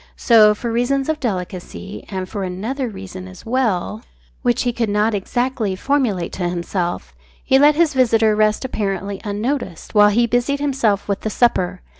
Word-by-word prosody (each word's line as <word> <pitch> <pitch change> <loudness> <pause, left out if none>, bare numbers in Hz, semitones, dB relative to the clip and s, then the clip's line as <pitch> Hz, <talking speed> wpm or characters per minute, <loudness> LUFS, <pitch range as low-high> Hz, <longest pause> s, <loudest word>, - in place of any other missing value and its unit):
So, 215 -3 +6
for 235 +2 -4
reasons 265 +4 0
of 315 -1 0
delicacy 190 - -5
and 190 -2 -4
for 200 +1 -4
another 225 +9 -3
reason 190 -2 -9
as 185 -1 -13
well 225 -4 -1 0.4
which 245 -2 +1
he 245 -1 0
could 230 -2 -1
not 210 +2 +1
exactly 230 0 -1
formulate 225 -7 0
to 175 -2 -2
himself 175 - -3 0.3
he 265 - +4
let 295 +1 +6
his 320 -1 +2
visitor 225 -4 +3
rest 215 +3 +1
apparently 200 -4 -3
unnoticed, 210 - -3
while 210 -1 +6
he 235 +3 +3
busied 245 +4 0
himself 265 -8 0
with 200 -1 -2
the 220 - -2
supper. 185 -6 +1
215 Hz, 165 wpm, -20 LUFS, 190-250 Hz, 0.4 s, So